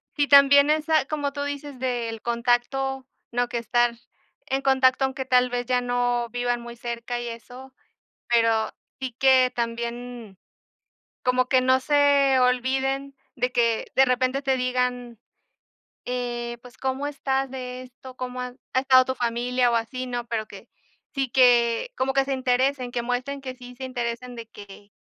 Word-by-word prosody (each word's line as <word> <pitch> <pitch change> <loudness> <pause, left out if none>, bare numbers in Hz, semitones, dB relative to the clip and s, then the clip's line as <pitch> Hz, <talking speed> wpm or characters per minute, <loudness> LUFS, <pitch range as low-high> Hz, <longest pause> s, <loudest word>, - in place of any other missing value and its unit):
si 290 -1 +1
también 280 0 +7
esa, 310 -1 +2
como 290 -1 -3
tú 285 0 -3
dices, 285 -1 -6
del 240 -3 -3
contacto, 245 +3 0 0.3
no 245 0 0
que - - -3
estar 240 +1 +1 0.5
en 270 -1 -1
contacto, 265 -1 +3
aunque 265 0 -2
tal 250 -1 +3
vez 245 0 -2
ya 250 0 +1
no 245 -1 0
vivan 245 0 -1
muy 235 0 -10
cerca 240 0 -4
y 240 - -5
eso, 245 +3 -10 0.6
pero 230 -2 +2 0.3
sí 260 -1 -3
que 260 -1 +5
también, 235 -2 -5 0.9
como 250 0 +2
que 255 0 +3
no 260 0 +3
se 280 -1 +3
olviden, 265 +2 0 0.2
de 250 0 -1
que 235 -2 +1
de 265 - +6
repente 255 +1 +1
te 270 -2 +1
digan 250 -1 -1 0.9
eh, 240 -1 -3
pues: 250 -1 -15
"¿Cómo 265 +2 -2
estás 270 -2 -2
de 255 -1 -6
esto?, 255 +1 -13
¿Cómo 250 0 -5
ha 250 0 -5 0.2
ha 260 - +3
estado 260 -1 +5
tu 260 - -2
familia 245 +1 0
o - - +1
así?", 230 +3 -2
¿no?, 240 -1 -4
pero 220 -2 -3
que 200 +2 -12 0.5
sí, 270 -2 -1
que 240 - +3
como 270 +1 0
que 270 0 +2
se 275 - -1
interesen, 260 0 0
que 240 - -2
muestren 250 +4 -3
que 260 -1 -6
sí 250 -1 -12
se 265 - -8
interesen, 245 -1 -4
de 230 -1 -8
que 205 0 -13
250 Hz, 165 wpm, -24 LUFS, 240-265 Hz, 0.9 s, también